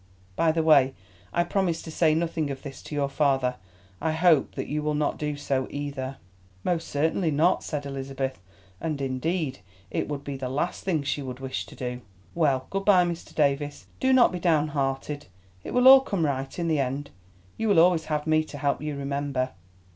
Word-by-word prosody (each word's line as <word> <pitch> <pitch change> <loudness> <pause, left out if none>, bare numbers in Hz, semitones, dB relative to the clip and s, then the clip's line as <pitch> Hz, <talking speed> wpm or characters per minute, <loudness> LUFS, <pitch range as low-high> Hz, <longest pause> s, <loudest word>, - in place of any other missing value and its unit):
By 160 - +3
the 160 0 0
way, 140 -4 +5 0.4
I 175 - +2
promised 175 -2 -1
to 160 - -7
say 155 -1 +3
nothing 160 -2 -1
of 135 -1 -6
this 140 -2 -8
to 150 - -7
your 140 -1 +1
father. 135 -3 +1 0.4
I 160 0 0
hope 160 -3 +3
that - - -3
you 150 +1 -2
will 150 0 0
not 150 0 0
do 150 -1 -2
so, 135 -2 -1
either." 140 -2 -4 0.5
"Most 170 -2 -1
certainly 160 +4 +1
not," 155 +4 +3
said 145 -2 -4
Elizabeth, 135 -3 -4 0.4
and 155 -3 -3
indeed 135 - -2 0.3
it - - -1
would 145 -1 -4
be 140 -1 -5
the 130 -1 -4
last 145 +7 -2
thing 165 -6 0
she 145 +1 -1
would 130 -1 -6
wish 130 -1 -4
to - - -12
do. 125 -1 -4 0.3
"Well, 140 -6 +1
good 195 0 -1
bye, 185 -4 +6
Mr. 170 -1 -5
Davies. 145 -1 0
Do 260 - +2
not 260 -2 +6
be 180 - -4
downhearted; 150 -3 0 0.4
it - - -6
will 250 +1 +4
all 265 0 +11
come 195 -10 -1
right 135 -2 -2
in 170 -1 -1
the 155 -3 +2
end. 140 +2 -2 0.4
You 225 - -2
will 200 -5 +5
always 170 -1 +4
have 150 -1 -2
me 155 0 +3
to 145 - -9
help 140 0 0
you, 150 -2 -3
remember." 140 -2 -2
150 Hz, 200 wpm, -26 LUFS, 135-165 Hz, 0.5 s, all